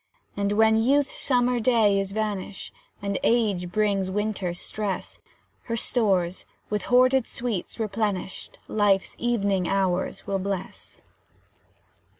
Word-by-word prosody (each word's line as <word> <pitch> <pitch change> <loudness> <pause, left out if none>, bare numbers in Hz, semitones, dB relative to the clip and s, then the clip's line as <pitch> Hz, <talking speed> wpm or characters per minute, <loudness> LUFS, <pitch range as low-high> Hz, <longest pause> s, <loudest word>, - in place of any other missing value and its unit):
And 200 0 0
when 220 +1 +4
Youth's 275 +4 +2
summer 245 -2 +2
day 220 -4 +3
is 195 0 -2
vanished, 205 -2 -4 0.3
And 200 -1 -1
Age 205 -7 +1
brings 200 -2 +1
Winter's 195 -3 -2
stress, 210 -3 -4 0.5
Her 230 -1 -2
stores, 190 -7 +1 0.3
with 210 -2 -1
hoarded 255 0 +4
sweets 235 -4 -4
replenished, 205 -3 -3
Life's 205 -3 +2
evening 200 -6 +1
hours 190 -1 0
will 195 -1 -1
bless. 190 -1 -6
205 Hz, 115 wpm, -25 LUFS, 195-230 Hz, 0.5 s, when